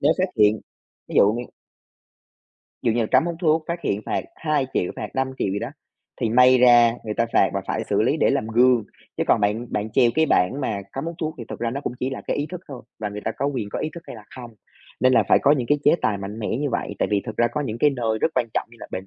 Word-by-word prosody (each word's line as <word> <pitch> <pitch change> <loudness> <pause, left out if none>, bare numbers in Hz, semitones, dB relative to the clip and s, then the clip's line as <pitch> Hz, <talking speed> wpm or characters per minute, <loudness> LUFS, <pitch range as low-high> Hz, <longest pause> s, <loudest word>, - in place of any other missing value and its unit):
nếu 150 +3 +4
phát 185 0 +1
hiện, 105 -1 +4 0.5
ví - - -8
dụ 100 +2 +5
như 120 +1 -4 1.4
Dụ 115 - +2
như 120 - 0
là 110 - +1
cấm 130 +6 +4
hút 170 - -2
thuốc, 160 -2 +2
phát 170 0 -3
hiện 100 - 0
phạt - - -1
2.000.000, 140 - -1
phạt 105 - -5
5.000.000 130 -5 -1
gì 100 - -1
đó, 115 - -4 0.5
thì 115 - +1
may 125 +2 +6
ra 120 -2 +6
người 105 -1 -3
ta 115 - +1
phạt - - +4
và - - 0
phải - - -2
xử - - +1
lý - - +2
để - - +2
làm - - 0
gương. 120 -1 +4 0.3
Chứ - - 0
còn - - +3
bạn 105 +4 0
bạn 105 +1 -2
treo 120 0 +4
cái 160 0 +3
bảng 130 +9 +2
mà 105 -6 -2
cấm 135 - -4
hút 170 +1 -4
thuốc 155 -1 -3
thì 120 - -6
thực - - -7
ra 115 -1 -1
nó 140 +3 -4
cũng 120 - -4
chỉ 130 +1 -1
là - - -5
cái - - -1
ý 145 - -2
thức 180 -1 -6
thôi, 130 -4 -8 0.2
và 105 -1 -3
người 105 +1 -7
ta - - 0
có 140 - -2
quyền 125 -8 -3
có - - -4
ý 155 - -2
thức 170 - -9
hay - - -8
là 105 - -13
không, 125 -2 -9 0.5
nên 130 0 +4
là 115 - +5
phải - - +6
có 145 - +4
những 130 -5 0
cái 145 - +2
chế 150 - +6
tài 100 -2 +1
mạnh 100 +3 -7
mẽ 105 - -3
như 145 -2 -1
vậy, - - -3
tại - - 0
vì 100 -1 +2
thực 110 - -6
ra 120 - +3
có 150 - -3
những 120 -6 -4
cái 150 - +4
nơi 115 -5 -1
rất - - +3
quan 125 -2 +1
trọng - - -1
như 120 - -16
là - - -8
bệnh 95 +1 -5
120 Hz, 290 wpm, -23 LUFS, 110-140 Hz, 1.4 s, may